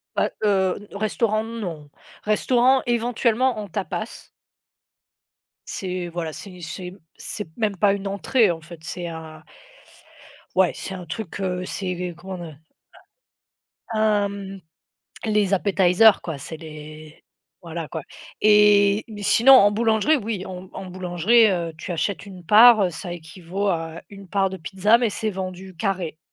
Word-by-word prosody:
Bah, -, -, +1 dB
heu, 190 Hz, -3 st, +2 dB, 0.2 s
n -, -, -7 dB
restaurant 215 Hz, +1 st, 0 dB
non, 180 Hz, -10 st, -6 dB, 0.3 s
restaurant 250 Hz, +5 st, +3 dB
éventuellement 240 Hz, +1 st, +1 dB
en 210 Hz, -, -5 dB
tapas. 205 Hz, +5 st, -5 dB, 1.4 s
C'est, 185 Hz, -2 st, -4 dB
voilà, 165 Hz, -2 st, -4 dB
c'est 185 Hz, +1 st, -10 dB
c'est 175 Hz, +2 st, -6 dB
m 185 Hz, +2 st, -11 dB, 0.2 s
c'est 210 Hz, -, -5 dB
même 210 Hz, -4 st, -1 dB
pas 200 Hz, +1 st, +4 dB
une 200 Hz, 0 st, -4 dB
entrée 200 Hz, +2 st, +2 dB
en 165 Hz, -1 st, -6 dB
fait, 170 Hz, +1 st, -12 dB
c'est 175 Hz, +1 st, -5 dB
un 160 Hz, -1 st, -9 dB, 1.1 s
ouais 185 Hz, -3 st, +4 dB
c'est 190 Hz, -, -6 dB
un 180 Hz, -1 st, -8 dB
truc, 205 Hz, +3 st, -6 dB
heu, 185 Hz, -1 st, -2 dB
c'est 180 Hz, -2 st, -4 dB
comment 190 Hz, +2 st, -7 dB, 1.6 s
on 220 Hz, -, -1 dB
a -, -, +1 dB
un 210 Hz, -2 st, +3 dB
m 195 Hz, -1 st, -8 dB, 0.6 s
les 210 Hz, -3 st, +2 dB
appetizers 195 Hz, +2 st, +4 dB
quoi 165 Hz, -3 st, -4 dB
c'est 160 Hz, +4 st, -7 dB
les 155 Hz, 0 st, -11 dB, 0.4 s
voilà 165 Hz, -2 st, -6 dB
quoi 160 Hz, -, -5 dB, 0.4 s
et 210 Hz, -1 st, +5 dB
mais 210 Hz, -2 st, -8 dB
sinon 245 Hz, +6 st, +6 dB
en 205 Hz, -5 st, +7 dB
boulangerie, 220 Hz, +7 st, +2 dB
oui 215 Hz, -6 st, -4 dB
en 185 Hz, 0 st, -8 dB
en 190 Hz, -, -7 dB
boulangerie, 185 Hz, +5 st, +3 dB
heu, 170 Hz, -3 st, -2 dB
tu 180 Hz, -, -5 dB
achètes 195 Hz, +4 st, -2 dB
une 185 Hz, -3 st, -11 dB
part, 220 Hz, +3 st, +8 dB
heu, 180 Hz, -, 0 dB
ça 175 Hz, +2 st, -7 dB
équivaut 175 Hz, +4 st, -5 dB
à 165 Hz, -2 st, -3 dB
une 200 Hz, -1 st, -12 dB
part 195 Hz, +1 st, +1 dB
de 190 Hz, -, -5 dB
pizza, 195 Hz, +6 st, +2 dB
mais 240 Hz, -3 st, +1 dB
c'est 215 Hz, +2 st, -2 dB
vendu 185 Hz, -1 st, -6 dB
carré. 185 Hz, -5 st, -2 dB
195 Hz, 155 wpm, -23 LUFS, 175-215 Hz, 1.6 s, part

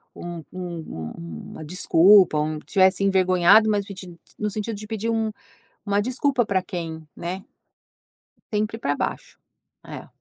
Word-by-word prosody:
um 175 Hz, -2 st, -7 dB
um 170 Hz, -, -6 dB
um 85 Hz, -2 st, -9 dB
uma -, -, -8 dB
desculpa, 180 Hz, +1 st, +5 dB
um 155 Hz, +1 st, -2 dB
tivesse 190 Hz, +4 st, +2 dB
envergonhado, 190 Hz, +2 st, +5 dB
mas 205 Hz, -2 st, +1 dB
pedin 185 Hz, -3 st, -10 dB, 0.2 s
no 210 Hz, 0 st, -1 dB
sentido 215 Hz, +2 st, -4 dB
de 210 Hz, +1 st, -8 dB
pedir 225 Hz, 0 st, -3 dB
um 225 Hz, -1 st, 0 dB, 0.5 s
uma 205 Hz, 0 st, +1 dB
desculpa 255 Hz, +2 st, +1 dB
pra 195 Hz, -3 st, +1 dB
quem, 160 Hz, -3 st, -6 dB
né. 185 Hz, +3 st, -5 dB, 1.1 s
Sempre 215 Hz, +1 st, -1 dB
pra 145 Hz, -9 st, 0 dB
baixo. -, -, -4 dB, 0.5 s
É. -, -, -9 dB
190 Hz, 140 wpm, -24 LUFS, 170-210 Hz, 1.1 s, desculpa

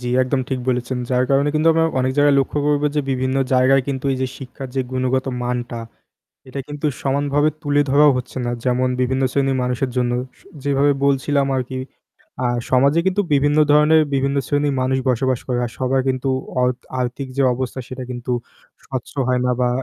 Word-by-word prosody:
জ্বী, 125 Hz, -, -4 dB
একদম 130 Hz, +1 st, 0 dB
ঠিক 130 Hz, -, -1 dB
বলেছেন 125 Hz, 0 st, -1 dB
যার 125 Hz, 0 st, +2 dB
কারণে 140 Hz, +1 st, +3 dB
কিন্তু 155 Hz, +2 st, +3 dB
আমরা 165 Hz, 0 st, +2 dB, 0.2 s
অনেক 130 Hz, +1 st, 0 dB
জায়গায় 145 Hz, -1 st, +5 dB
লক্ষ্য 135 Hz, -, -2 dB
করবো 150 Hz, 0 st, +2 dB
যে 150 Hz, -, +2 dB
বিভিন্ন 130 Hz, 0 st, 0 dB, 0.2 s
জায়গায় 130 Hz, +1 st, +4 dB
কিন্তু 135 Hz, -1 st, -3 dB
এই 130 Hz, -, -2 dB
যে 130 Hz, -, +1 dB
শিক্ষার 135 Hz, 0 st, -8 dB
যে 135 Hz, -, +1 dB
গুণগত 130 Hz, +1 st, 0 dB, 0.2 s
মানটা 120 Hz, -1 st, -3 dB, 0.7 s
এটা 135 Hz, +2 st, -5 dB
কিন্তু 145 Hz, +1 st, -3 dB
সমানভাবে 145 Hz, +2 st, +1 dB
তুলে 145 Hz, -1 st, +2 dB
ধরাও 145 Hz, +1 st, +6 dB
হচ্ছে 125 Hz, +1 st, -6 dB
না। 120 Hz, -, -1 dB
যেমন 125 Hz, 0 st, +1 dB
বিভিন্ন 130 Hz, +1 st, 0 dB
শ্রেণির 135 Hz, -1 st, +1 dB
মানুষের 125 Hz, +1 st, -1 dB
জন্য 120 Hz, -1 st, +1 dB, 0.3 s
স -, -, -22 dB, 0.2 s
যেভাবে 140 Hz, 0 st, +2 dB
বলছিলাম 140 Hz, 0 st, +2 dB
আরকি। 130 Hz, 0 st, -3 dB, 0.7 s
আ -, -, +3 dB, 0.2 s
সমাজে 140 Hz, +5 st, +4 dB
কিন্তু 190 Hz, +2 st, +2 dB
বিভিন্ন 145 Hz, +2 st, +2 dB
ধরণের 150 Hz, +1 st, +5 dB
বিভিন্ন 135 Hz, +1 st, 0 dB
শ্রেণির 145 Hz, -1 st, +1 dB
মানুষ 130 Hz, +1 st, +1 dB
বসবাস 130 Hz, 0 st, 0 dB
করে 125 Hz, -, 0 dB
আর 120 Hz, -, -4 dB
সবার 130 Hz, +1 st, +1 dB
কিন্তু 130 Hz, +1 st, -1 dB, 0.3 s
অর্ত 125 Hz, 0 st, 0 dB, 0.2 s
আর্থিক 125 Hz, +2 st, -3 dB
যে 140 Hz, -, +2 dB
অবস্থা 130 Hz, +1 st, -4 dB
সেটা 130 Hz, 0 st, -6 dB
কিন্তু 125 Hz, 0 st, -4 dB, 0.5 s
স্বচ্ছ 130 Hz, -3 st, -6 dB, 0.2 s
হয় 125 Hz, -1 st, +2 dB
না। 125 Hz, -, +2 dB
বা 125 Hz, -, +3 dB
130 Hz, 185 wpm, -20 LUFS, 125-140 Hz, 0.7 s, ধরাও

